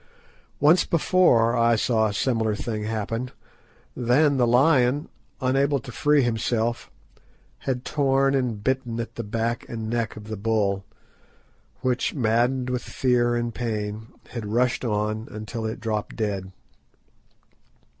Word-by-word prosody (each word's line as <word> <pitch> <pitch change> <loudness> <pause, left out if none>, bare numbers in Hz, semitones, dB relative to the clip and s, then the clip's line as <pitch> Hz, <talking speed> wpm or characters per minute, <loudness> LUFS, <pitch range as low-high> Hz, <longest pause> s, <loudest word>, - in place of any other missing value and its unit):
Once 155 +5 +5
before 150 -9 +3
I 115 0 +4
saw 110 0 +2
a 105 - -3
similar 110 -3 +1
thing 105 -1 -4
happen. 115 +3 -3 0.7
Then 135 +4 +3
the 125 -2 +3
lion, 130 +2 +3 0.3
unable 135 +1 +2
to 120 - -10
free 145 +2 +3
himself, 115 0 -1 0.8
had 125 -1 -2
torn 135 -2 +2
and 120 -6 -1
bitten 125 -3 -1
at 115 - -4
the 115 - -5
back 115 +2 -2
and 110 -1 -4
neck 120 -1 -1
of 110 - -9
the 110 0 -6
bull, 100 -2 0 1.0
which, 125 +3 0
maddened 125 +1 +1
with 125 -1 -1
fear 120 -2 +1
and 120 -1 -2
pain, 110 -2 -3 0.2
had 115 -4 -5
rushed 125 +5 +1
on 110 -1 -1
until 110 +1 -5
it 110 - -5
dropped 110 -2 -3
dead. 100 -4 -3
120 Hz, 135 wpm, -24 LUFS, 110-130 Hz, 1.0 s, Once